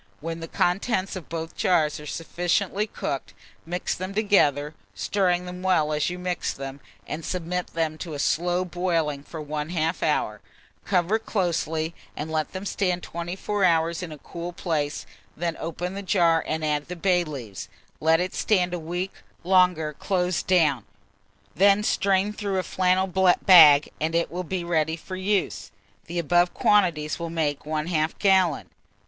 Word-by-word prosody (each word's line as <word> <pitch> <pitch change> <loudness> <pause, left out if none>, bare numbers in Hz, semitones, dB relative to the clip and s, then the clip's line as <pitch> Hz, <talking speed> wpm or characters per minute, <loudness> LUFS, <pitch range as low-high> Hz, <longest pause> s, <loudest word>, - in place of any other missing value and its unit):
When 165 +1 -5
the 165 - -6
contents 190 +3 0
of 185 -5 -8
both 165 0 -5
jars 155 -5 +2
are 150 - -9
sufficiently 175 +6 -1
cooked, 140 -8 -5 0.3
mix 175 +1 -2
them 185 +2 -5
together, 150 -9 +2 0.2
stirring 180 -3 +1
them 180 0 -7
well 160 -5 +2
as 150 +2 0
you 180 - -5
mix 180 -1 -2
them, 135 0 -7 0.3
and 160 +2 -5
submit 180 +1 -3
them 160 -1 -2
to 165 -4 -5
a - - -4
slow 175 +5 +1
boiling 165 -5 -1
for 160 +3 -9
1/2 155 +2 -2
hour; 105 -8 0 0.4
cover 185 +3 +2
closely, 170 -6 -1 0.2
and 155 +2 -4
let 155 -1 -1
them 185 +1 -6
stand 180 -3 -1
24 185 +4 -3
hours 165 -1 +2
in 175 -3 -6
a 155 - -8
cool 170 +4 -7
place; 155 -5 -2 0.3
then 170 0 -2
open 175 +3 -4
the 200 - -5
jar 170 -3 +3
and 155 0 -1
add 150 -1 -1
the 180 - -5
bay 180 0 +2
leaves; 125 - -7 0.3
let 160 +1 +4
it 180 +1 -2
stand 180 -4 +1
a 175 - -2
week 175 +4 -4 0.3
longer 180 -4 +3
closed 180 +2 -1
down, 155 - +3 0.7
when 200 +2 +4
strain 200 0 +1
through 200 -2 -2
a 185 - 0
flannel 185 +1 +2
bag, 180 -5 +6
and 160 +2 0
it 170 - +1
will 180 +2 -3
be 180 +1 -3
ready 160 -2 0
for 185 +3 -8
use. 190 +1 -1 0.4
The 170 +1 -5
above 175 +2 +2
quantities 170 -8 +2
will 170 0 -4
make 155 -4 -1
1/2 155 0 -1
gallon. 190 -5 +2
175 Hz, 160 wpm, -25 LUFS, 155-185 Hz, 0.7 s, bag